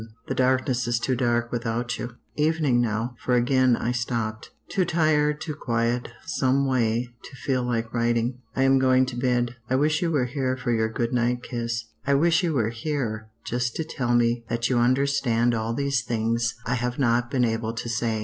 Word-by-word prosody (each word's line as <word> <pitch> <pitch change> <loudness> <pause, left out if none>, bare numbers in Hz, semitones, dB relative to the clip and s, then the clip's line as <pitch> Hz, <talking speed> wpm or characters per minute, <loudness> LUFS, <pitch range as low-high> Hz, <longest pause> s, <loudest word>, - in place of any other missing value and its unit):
The - - -1
darkness 130 -1 +1
is 120 0 +1
too 130 +2 0
dark 120 -1 0
without 120 +1 -2
you. 120 -1 -6 0.2
"Evening 150 -5 +2
now, 115 +2 -1
for 125 - +1
again 125 0 +3
I 120 - -1
stopped; 115 -3 -3 0.2
too 190 -1 +1
tired, 155 -3 +2
too 155 - -4
quiet, 120 -3 -1 0.2
someway, 130 -3 +1 0.2
to - - -11
feel 130 0 -1
like 115 -2 -2
writing. 120 +1 0 0.2
I 135 - +2
am 135 0 +5
going 130 0 +4
to 125 - -6
bed. 120 -1 0
I 130 - +2
wish 155 +3 +2
you 175 - +1
were 145 -6 +1
here 130 0 -1
for 125 -1 -2
your 110 -1 +1
good 115 +2 -2
night 120 0 +1
kiss. 115 -2 -3 0.2
I 140 +1 +2
wish 165 +3 +3
you 165 -4 0
were 115 -3 +1
here 115 -4 -3
just 120 0 -2
to 160 - -1
tell 125 -6 -1
me 120 0 +2
that 120 0 0
you 120 - +3
understand 120 -2 +2
all 115 0 -1
these 140 -3 0
things 115 0 -1
I 120 - 0
have 125 0 -2
not 120 -2 +2
been 125 -1 +2
able 115 0 -1
to 115 - -5
say. 115 -1 -1
120 Hz, 195 wpm, -25 LUFS, 115-130 Hz, 0.2 s, am